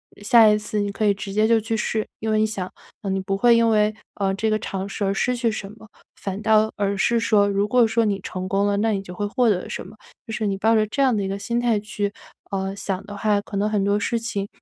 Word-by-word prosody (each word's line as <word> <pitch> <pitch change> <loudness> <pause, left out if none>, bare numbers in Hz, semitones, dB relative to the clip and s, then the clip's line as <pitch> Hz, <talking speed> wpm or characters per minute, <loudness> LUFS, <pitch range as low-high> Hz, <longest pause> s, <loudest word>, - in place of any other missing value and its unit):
呃， - - -15
下 225 +1 +7
一 210 - +4
次 210 0 -2
你 205 0 -2
可 205 - -4
以 205 - +4
直 195 0 -6
接 215 +2 +3
就 230 0 +4
去 225 +1 -2
试， 215 0 -1
因 220 - -3
为 215 - +2
你 215 - +3
想， 195 -4 -4 0.3
啊， 200 - -4
你 190 0 0
不 195 +1 -2
会 240 +3 +5
因 230 0 +3
为， 215 -1 +3 0.2
呃， 195 -1 0
这 220 +3 0
个 215 - +2
尝 195 -1 -4
试 200 +1 -4
而 195 - +1
失 250 +5 0
去 235 -1 0
什 200 -2 -6
么， 220 0 -15 0.3
反 195 0 -5
倒 220 0 +4
而 200 0 0
是 235 +3 +2
说 210 -3 +3
如 200 +1 +1
果 245 +2 +4
说 225 +1 +1
你 200 -2 0
成 185 0 -5
功 200 +1 +1
了， 200 0 +1
那 220 +2 +1
你 200 -2 -1
就 180 -2 -10
会 205 - -2
获 245 +3 +2
得 185 -4 0
什 - - -5
么？ 200 +4 -13 0.3
就 225 - -5
是 220 0 -2
你 195 - 0
抱 225 +3 +3
着 215 -1 +3
这 275 +7 -2
样 255 -3 +3
的 200 - -1
一 - - -2
个 195 +1 -3
心 235 +4 -1
态 235 -3 +2
去， 205 -1 -3 0.4
呃， 195 0 -2
想 195 -1 -3
的 205 0 -7
话 205 0 +1
可 200 0 -6
能 205 +1 +1
很 210 -2 0
多 200 +1 +2
事 230 +2 -1
情， 205 -4 -3
210 Hz, 310 characters per minute, -23 LUFS, 200-220 Hz, 0.4 s, 下